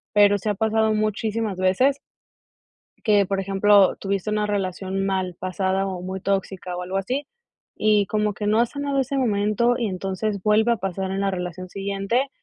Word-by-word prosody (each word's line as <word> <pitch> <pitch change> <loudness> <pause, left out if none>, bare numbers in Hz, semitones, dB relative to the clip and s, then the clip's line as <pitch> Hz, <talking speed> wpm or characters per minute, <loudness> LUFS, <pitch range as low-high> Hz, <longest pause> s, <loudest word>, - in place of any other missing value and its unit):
pero 205 0 +6
sí 200 - -7
ha - - +2
pasado 220 +1 +1
muchísimas 215 -1 -1
veces 190 +10 +2 1.1
que, 205 -3 +4
por 195 +1 -1
ejemplo, 195 0 +4
tuviste 200 +1 -2
una 210 0 0
relación 195 -1 -2
mal 190 -2 -1
pasada 190 +1 -1
o 185 -2 -4
muy 190 +1 -5
tóxica 190 -2 -2
o 180 - -4
algo 185 +2 -3
así 255 +9 -2 0.5
y 210 -1 +3
como 210 0 0
que 205 - -5
no 215 +2 +3
has 235 0 +2
sanado 285 -1 -1
ese 270 +1 -1
momento 215 0 +2
y 235 - -1
entonces 195 +2 -3
vuelve 220 +2 +3
a - - -3
pasar 190 0 -3
en 195 +1 -2
la 195 0 +1
relación 180 0 -5
siguiente, 200 +7 -1
200 Hz, 180 wpm, -23 LUFS, 190-215 Hz, 1.1 s, pero